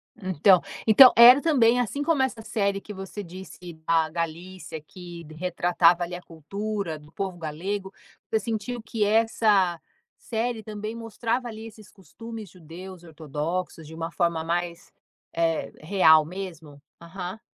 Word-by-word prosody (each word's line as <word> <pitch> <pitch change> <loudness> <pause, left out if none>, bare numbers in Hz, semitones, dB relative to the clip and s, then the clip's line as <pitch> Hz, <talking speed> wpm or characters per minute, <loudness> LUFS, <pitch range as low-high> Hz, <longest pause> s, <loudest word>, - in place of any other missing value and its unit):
Então 185 - +3 0.3
então 250 +4 +9
era 245 +4 +9
também, 250 -7 +3
assim 245 +4 -2
como 300 -2 +1
essa 245 -4 -3
série 200 -3 -1
que 210 - -9
você 195 +1 -7
disse 180 -1 -10
da 165 -1 +2
Galícia 170 +1 -6
que 175 +1 -11
d 155 +1 -13
retratava, 175 0 +2
ali, 175 +1 -5
a 175 - -8
cultura 195 +2 -5
do 150 0 -17
povo 190 -3 -4
galego, 190 +5 -5 0.4
você 220 - +1
sentiu 225 +3 -4
que 220 -1 -2
essa 210 -5 +2 0.4
série 225 0 -3
também 215 +1 -6
mostrava, 230 +2 -3
ali, 220 -1 -8
esses 215 -3 -15
costumes 215 +3 -10
judeus 180 +2 -11
ortodoxos 160 +1 -5
de 160 - -11
uma 165 +1 -5
forma 170 -3 0
mais, 170 +2 -3 0.4
eh, 165 -1 0
real 160 -3 +5
mesmo? 165 -5 -8 0.2
Aham. 180 +3 -7
185 Hz, 145 wpm, -25 LUFS, 165-220 Hz, 0.4 s, então